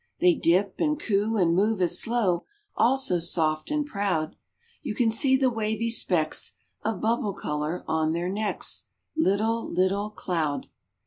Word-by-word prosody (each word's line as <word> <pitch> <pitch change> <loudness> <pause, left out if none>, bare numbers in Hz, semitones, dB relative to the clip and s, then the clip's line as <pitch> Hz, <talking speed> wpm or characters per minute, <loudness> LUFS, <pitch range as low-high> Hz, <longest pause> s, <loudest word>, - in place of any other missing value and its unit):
They 180 -1 +5
dip, 185 +5 +1
and 300 -1 +1
coo, 215 -2 0
and 170 -4 +3
move 205 +3 +2
as 180 -2 +3
slow, 215 -7 0 0.3
All 260 +3 +3
so 185 -10 +1
soft 160 -2 +1
and 300 -1 0
proud! 200 - -1 0.5
You 245 -8 -4
can 230 -1 +2
see 265 +4 +3
the 260 -1 +2
wavy 220 0 -1
specks 170 -8 +1 0.3
Of 220 -4 -2
bubble 220 -3 0
color 150 +4 -3
on 160 0 +1
their 170 +1 -2
necks; 210 +2 -2 0.3
Little, 225 -4 +1
little 195 +3 +1
Cloud. 165 -8 -2
200 Hz, 150 wpm, -26 LUFS, 175-225 Hz, 0.5 s, They